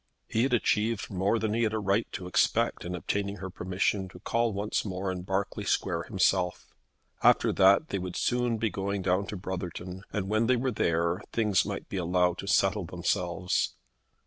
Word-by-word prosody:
He 110 - 0
had 130 +1 +1
achieved 110 -1 0
more 95 +4 +1
than 110 -1 -1
he 115 - +1
had 110 -2 +1
a - - 0
right 100 +2 0
to 95 - -5
expect 90 - +1
in 90 0 -3
obtaining 100 +3 -2
her 95 -1 -7
permission 95 +2 -1
to - - -13
call 115 0 0
once 100 +1 -1
more 95 -1 -3
in 90 -1 -4
Berkeley 95 +3 -2
Square 85 -4 0
himself. 95 -3 +1 0.6
After - - +4
that 100 +10 +5
they 100 - -1
would 90 0 -5
soon 120 -2 +1
be 110 -1 0
going 100 0 -2
down 95 +2 +1
to 105 - -5
Brotherton, 90 0 -5
and 100 -2 -2
when 110 +2 +2
they 130 - +4
were 125 +2 0
there 85 -4 +1
things 105 -5 +2
might - - -5
be 100 - -4
allowed 90 0 +1
to 100 - -6
settle 100 -1 +2
themselves. 90 +1 -1
95 Hz, 190 wpm, -29 LUFS, 90-105 Hz, 0.6 s, that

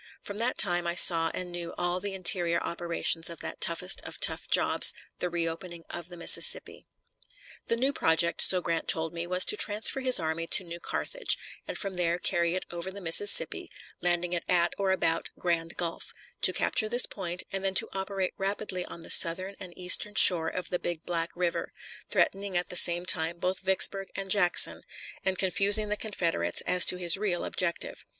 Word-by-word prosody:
From 205 +1 -8
that 240 +2 -2
time 175 -3 +1
I 170 - -4
saw 165 -2 +6
and 180 -1 -8
knew 170 -1 -9
all 175 +1 -3
the 200 0 -6
interior 175 -2 +2
operations 170 -1 -3
of 170 - -12
that - - -9
toughest 180 +3 +2
of - - -11
tough - - +1
jobs, - - +4 0.3
the 180 - -4
reopening 170 0 -7
of 170 -1 -9
the 175 - -13
Mississippi. 170 - +4 0.8
The 230 - -1
new 265 +4 -2
project, 165 -3 +1
so 185 -1 +6
Grant 165 -1 -5
told 160 0 +1
me, 170 0 -7
was 180 +1 +4
to 420 - 0
transfer 215 - +2
his 255 -4 +5
army 165 0 -5
to 190 - +4
New 170 -1 -11
Carthage, - - -3 0.3
and - - -6
from 195 -3 -7
there 170 -1 -2
carry 170 -1 -2
it 185 - -6
over 170 +2 -8
the 195 +1 -11
Mississippi, 195 +3 +3 0.3
landing 175 0 -1
it 170 - -5
at 175 -1 0
or 195 -1 -2
about 165 -3 -2
Grand 170 -1 -4
Gulf; 170 -1 -5 0.3
to - - +5
capture 215 - -2
this 245 +2 +4
point, 180 -2 -7
and 195 0 -6
then 190 0 -3
to - - +2
operate 190 -1 -5
rapidly 195 -1 -5
on 170 - -11
the - - -4
southern 185 +4 +3
and 185 -2 -11
eastern 185 +3 +4
shore 165 -3 +5
of 180 +2 -7
the 180 - -3
Big 170 -2 -7
Black 170 -1 -3
River, 175 -1 -5 0.4
threatening 195 -1 -2
at 175 - -4
the - - -7
same 175 0 +4
time 170 -2 0
both 180 +2 -4
Vicksburg 195 0 +1
and 195 -1 -6
Jackson, 180 -4 +3 0.4
and 190 -1 -3
confusing 200 +3 +2
the 210 - -3
Confederates 170 - -3
as 180 -1 +2
to 180 - +3
his 175 0 +2
real 190 -4 -4
objective. 170 -2 -6
180 Hz, 190 wpm, -26 LUFS, 170-195 Hz, 0.8 s, saw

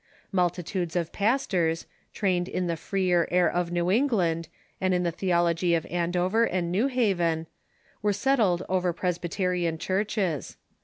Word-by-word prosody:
Multitudes 180 -1 -1
of 170 -2 -1
pastors, 195 -8 +1 0.3
trained 180 -3 0
in 180 - -2
the 170 -1 -1
freer 180 0 +1
air 180 -1 +3
of 175 +1 -1
New 175 +1 +1
England 185 - +1 0.3
and 185 -1 +2
in 180 - +1
the 170 - 0
theology 170 -1 +1
of 165 - -1
Andover 180 +5 +1
and 175 -5 -1
New 210 +9 +2
Haven, 180 -11 +1 0.6
were 210 -1 +2
settled 200 -5 +2
over 180 -1 +1
Pres 175 0 -1
byterian 175 -2 -1
churches. 190 -5 -1
180 Hz, 145 wpm, -27 LUFS, 170-195 Hz, 0.6 s, air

